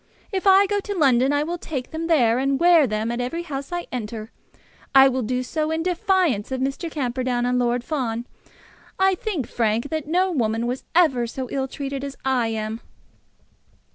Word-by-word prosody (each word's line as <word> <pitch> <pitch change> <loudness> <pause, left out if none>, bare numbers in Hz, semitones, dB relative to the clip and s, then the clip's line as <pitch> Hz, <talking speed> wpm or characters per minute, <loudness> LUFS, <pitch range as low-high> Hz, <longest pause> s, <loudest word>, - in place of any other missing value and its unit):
If 385 0 -1
I 390 +1 +7
go 410 +1 0
to 405 0 -5
London, 265 -3 +4
I 290 0 +1
will 340 +3 -4
take 270 -7 -5
them 325 +1 -3
there, 250 -8 +3
and 275 0 +1
wear 340 -4 +6
them 215 +1 -2
at 240 +1 -2
every 330 +8 -3
house 275 -3 -6
I 350 0 -3
enter. 220 -1 -5 0.6
I 270 0 +9
will 260 -1 0
do 250 +2 -1
so 310 +4 -2
in 320 0 -1
defiance 350 - +1
of 260 - -2
Mr. 275 +6 -2
Camperdown 250 -4 -1
and 250 0 +1
Lord 240 0 0
Fawn. 240 -6 -2 0.7
I 380 0 +4
think, 365 - -3
Frank, 230 +4 -1
that 315 -2 -3
no 365 +4 +2
woman 230 -6 0
was 250 +2 -3
ever 270 -9 +3
so 255 +2 -5
ill 270 -1 -1
treated 275 0 -5
as 280 -1 -6
I 255 -3 +2
am." 220 0 -3
270 Hz, 190 wpm, -23 LUFS, 240-325 Hz, 0.7 s, I